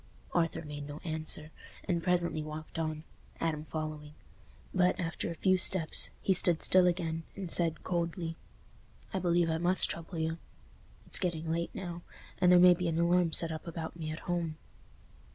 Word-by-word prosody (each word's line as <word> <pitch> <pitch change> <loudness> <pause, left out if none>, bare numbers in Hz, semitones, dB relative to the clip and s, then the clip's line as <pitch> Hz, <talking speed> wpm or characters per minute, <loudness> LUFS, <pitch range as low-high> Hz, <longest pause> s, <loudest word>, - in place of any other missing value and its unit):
Arthur 165 -1 0
made 145 -1 -7
no 145 0 -7
answer, 155 -1 -1 0.3
and 175 -3 -1
presently 175 -3 +1
walked 155 +1 -7
on, 155 -1 -3 0.4
Adam 155 -2 -1
following. 155 -1 -6 0.6
But, 185 +1 +2
after 165 -1 -2
a 170 - -5
few 185 +2 +2
steps, 175 -3 +3
he 195 - +3
stood 175 -2 +4
still 185 -1 +5
again, 165 -2 -1
and 190 -4 -4
said, 165 -2 +3
coldly, 170 -1 -2 0.8
"I 190 - 0
believe 175 -2 +2
I 160 - -1
must 180 +2 +2
trouble 165 +1 -7
you. 160 +1 -2 0.7
It's - - +3
getting 165 -3 -2
late 170 +1 -1
now, 175 -2 -6 0.4
and 180 -1 +5
there 180 - +8
may 180 0 +8
be 175 0 -2
an 165 -1 -1
alarm 170 0 +3
set 165 +1 +1
up 160 +2 -7
about 165 -1 -5
me 160 -2 -5
at 155 +1 -6
home." 170 -3 -2
165 Hz, 170 wpm, -31 LUFS, 160-175 Hz, 0.8 s, there